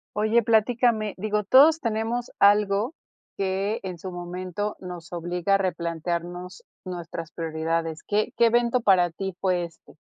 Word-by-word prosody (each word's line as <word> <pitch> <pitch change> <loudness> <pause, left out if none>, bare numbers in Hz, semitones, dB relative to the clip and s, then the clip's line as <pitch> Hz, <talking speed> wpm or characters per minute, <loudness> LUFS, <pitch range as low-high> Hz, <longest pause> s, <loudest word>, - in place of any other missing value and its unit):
Oye, 215 +3 +3
platícame, 225 -1 +2
digo, 210 +2 -1
todos 295 +9 +6
tenemos 230 0 -2
algo 205 +5 +3 0.4
que 195 +3 -1
en 185 -2 -5
su 185 +2 -7
momento 180 +3 -4
nos 175 -3 -9
obliga 175 +3 0
a - - +4
replantearnos 175 0 -3 0.2
nuestras 170 -2 -6
prioridades. 165 0 -2
¿Qué 210 +1 0
qué 235 - +5
evento 240 +1 +2
para 185 -5 +4
ti 190 +2 -5
fue 180 -2 +1
este? 165 -1 -13
190 Hz, 135 wpm, -25 LUFS, 175-215 Hz, 0.4 s, todos